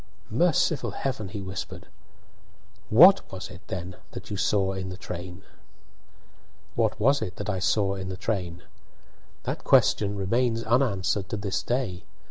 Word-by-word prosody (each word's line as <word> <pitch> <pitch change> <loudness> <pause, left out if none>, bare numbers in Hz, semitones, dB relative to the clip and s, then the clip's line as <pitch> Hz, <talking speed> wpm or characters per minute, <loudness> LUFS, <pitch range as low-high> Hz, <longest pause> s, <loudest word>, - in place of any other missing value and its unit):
"Merciful 160 +2 +2
Heaven!" 125 -7 -2
he 100 +1 -6
whispered. 95 0 -6 1.0
"What 180 - +7
was 95 -1 -6
it, 90 - -11
then, 90 0 -5 0.2
that - - -8
you - - -2
saw 95 0 +1
in 95 0 -4
the 90 - -7
train?" 90 0 -7 1.3
What 110 0 0
was 135 +6 +3
it 90 - -4
that 105 - -3
I 95 - -2
saw 100 0 +2
in 95 -1 -5
the 95 - -5
train? 90 -5 -3 0.8
That - - -4
question 105 -1 +4
remains 115 +4 0
unanswered 110 -5 +1
to 110 - -2
this 100 -2 -2
day. 120 -8 -2
100 Hz, 145 wpm, -26 LUFS, 95-115 Hz, 1.3 s, What